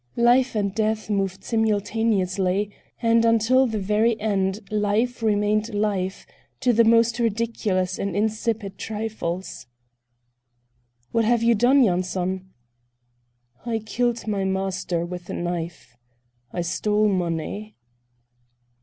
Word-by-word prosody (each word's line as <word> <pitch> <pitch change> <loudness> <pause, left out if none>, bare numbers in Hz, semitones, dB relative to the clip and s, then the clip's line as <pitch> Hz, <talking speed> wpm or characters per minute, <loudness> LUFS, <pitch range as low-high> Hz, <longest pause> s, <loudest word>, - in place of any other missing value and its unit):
Life 245 +1 +4
and 200 -2 0
Death 215 0 -1
moved 195 -2 -1
simultaneously, 205 -3 0 0.3
and 230 0 +4
until 230 +3 +4
the 220 -2 -2
very 215 +3 +1
end 200 -1 0
Life 215 +4 0
remained 210 0 +1
life, 200 -2 -1 0.4
to 250 -2 +3
the 230 +1 +5
most 230 +1 +4
ridiculous 215 -5 -1
and 195 -3 -2
insipid 215 -1 -1
trifles. 210 - -4 1.4
"What 230 -1 +2
have 235 0 +2
you 235 0 +5
done, 250 +5 +4
Yanson?" 185 -1 -1 1.1
"I 230 -1 -1
killed 235 +2 -1
my 200 -2 0
master 190 -3 -1
with 180 0 -8
a - - -3
knife. 170 -6 -5 0.6
I 175 - -2
stole 210 +5 +1
money." 185 +3 -2
210 Hz, 110 wpm, -24 LUFS, 190-230 Hz, 1.4 s, the